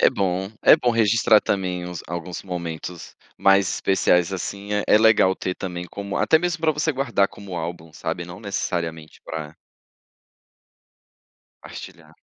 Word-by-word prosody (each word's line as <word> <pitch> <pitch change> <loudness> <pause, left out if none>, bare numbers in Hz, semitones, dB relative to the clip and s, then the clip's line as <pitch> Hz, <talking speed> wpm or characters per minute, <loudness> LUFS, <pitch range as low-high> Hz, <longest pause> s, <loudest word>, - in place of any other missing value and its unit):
É - - +6
bom, 95 0 -1
é - - +8
bom 120 - +1
registrar 115 -1 +4
também 90 -2 -2
uns 90 -1 -6
alguns 85 +1 -5
momentos 85 -1 -6 0.2
mais 95 -1 +4
especiais, 90 -2 +2
assim, 100 +2 -5
é 105 0 0
é - - +6
legal 110 -4 +5
ter 90 -1 -3
também 90 -2 -5
como 100 +1 -6
até 160 - +4
mesmo 175 -1 -2
para 160 -1 +3
você 150 +2 0
guardar 130 -7 +1
como 100 -3 -9
álbum, 80 -1 -6
sabe, 85 - -4
não 90 +2 -10
necessariamente 85 -6 -4
para 80 -1 -6 2.0
partilhar. - - -11
95 Hz, 145 wpm, -23 LUFS, 85-105 Hz, 2.0 s, é